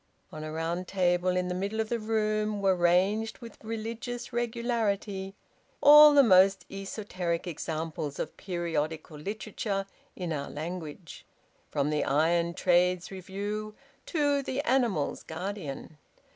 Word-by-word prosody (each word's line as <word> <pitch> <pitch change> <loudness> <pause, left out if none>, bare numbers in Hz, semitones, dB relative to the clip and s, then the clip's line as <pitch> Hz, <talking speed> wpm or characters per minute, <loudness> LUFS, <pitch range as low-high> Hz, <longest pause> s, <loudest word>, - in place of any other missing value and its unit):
On 155 - -7
a 155 - -5
round 165 +3 -3
table 180 -1 +1
in 180 0 0
the 180 - -2
middle 200 +4 -3
of 220 -1 -1
the 235 - -1
room 215 -1 0
were 195 -1 +3
ranged, 190 +6 +2
with 235 -2 -12
religious 230 +2 -5
regularity, 225 -5 -1 0.4
all 300 0 +9
the 280 - +8
most 195 -3 +5
esoteric 195 -3 -3
examples 155 -3 -4
of 155 - -4
periodical 160 -4 -3
literature 200 +2 -3 0.3
in 175 -3 -3
our 140 -2 -4
language, 165 +1 -7 0.5
from 145 +1 0
"The 150 - +1
Iron 170 +4 +2
Trades 180 0 +2
Review" 205 +3 -5 0.3
to 290 -3 +1
"The 265 0 -2
Animals' 240 - +1
Guardian." 160 -4 -6
190 Hz, 130 wpm, -29 LUFS, 170-220 Hz, 0.5 s, all